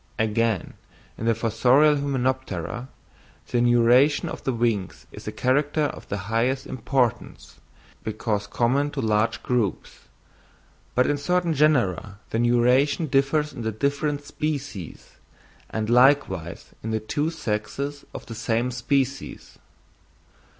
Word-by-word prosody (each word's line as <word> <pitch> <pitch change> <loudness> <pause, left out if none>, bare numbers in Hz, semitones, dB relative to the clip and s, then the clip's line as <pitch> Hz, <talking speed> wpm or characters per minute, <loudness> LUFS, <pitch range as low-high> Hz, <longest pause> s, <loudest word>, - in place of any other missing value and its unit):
Again 110 -2 0 0.4
in 115 - -4
the 115 - +3
fossorial 125 +7 +4
hymenoptera, 130 - -2 0.6
the 120 - +2
neuration 120 +4 +4
of - - -7
the 130 - 0
wings 115 -6 -1
is - - -11
a - - -2
character 145 +4 +1
of 145 - -4
the 100 - -2
highest 125 +5 0
importance, 125 -2 -2 0.4
because 110 -1 -2
common 130 +7 +1
to 145 - -4
large 110 0 +1
groups; 120 -6 -2 0.9
but 125 - +4
in 145 - +1
certain 175 +3 +1
genera 120 - +1
the 115 - 0
neuration 125 +6 +3
differs 145 +2 +1
in 120 - -7
the 110 -1 -1
different 140 +5 -1
species, 145 - -5 0.5
and 110 -1 -2
likewise 120 - +2
in 110 - -5
the 110 0 0
two 145 +8 -1
sexes 140 +1 -4
of - - -8
the 115 - -8
same 115 +2 -1
species. 135 +2 -2
125 Hz, 125 wpm, -24 LUFS, 110-140 Hz, 0.9 s, fossorial